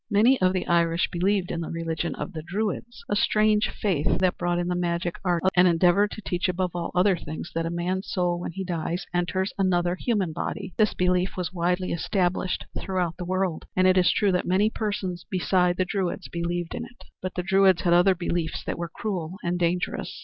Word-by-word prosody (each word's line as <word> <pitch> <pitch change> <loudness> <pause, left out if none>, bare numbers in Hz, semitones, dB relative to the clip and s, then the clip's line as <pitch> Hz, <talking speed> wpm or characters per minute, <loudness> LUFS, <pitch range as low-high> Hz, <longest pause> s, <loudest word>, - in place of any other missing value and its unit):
Many 230 +4 +4
of 185 0 +4
the 185 - -1
Irish 170 0 +2
believed 185 +1 0
in 170 - -2
the 165 - -4
religion 165 0 -3
of - - -6
the 160 - -5
Druids 215 +7 -4
a 205 - 0
strange 215 +1 +3
faith 180 -9 0
that 185 -1 +2
brought 175 0 -1
in 175 0 -1
the 180 - 0
magic 175 0 -1
arts 175 -1 +1
and 180 0 +6
endeavored 180 +4 +4
to 215 - -9
teach 180 +1 -1
above 180 0 -1
all 170 -1 -2
other 185 +1 +4
things 160 0 -7
that 165 0 -1
a - - -2
man's 180 +3 -2
soul 175 -2 0
when 175 - -4
he 190 +3 -5
dies 175 0 -3
enters 185 +2 0
another 175 -2 +2
human 190 -4 -1
body. 190 +3 -4
This 215 -1 +2
belief 180 +1 +1
was 180 0 -3
widely 180 +1 0
established 180 +1 -1
throughout 180 -4 -2
the 180 - -5
world, 185 -2 -1
and 185 - +3
it 185 0 +5
is 180 -2 +4
true 205 -2 +2
that 180 - 0
many 200 +4 +3
persons 195 -6 -3
beside 180 -1 +2
the 185 - +1
Druids 190 -1 -2
believed 170 0 -3
in - - -4
it; 240 0 -13 0.2
but 185 0 -4
the 180 - -2
Druids 190 -1 +4
had 170 - +3
other 180 +2 +5
beliefs 170 -2 -2
that - - -3
were 170 -1 -3
cruel 180 -3 -4
and 175 +1 -1
dangerous. 175 +1 -1
180 Hz, 210 wpm, -25 LUFS, 175-190 Hz, 0.2 s, and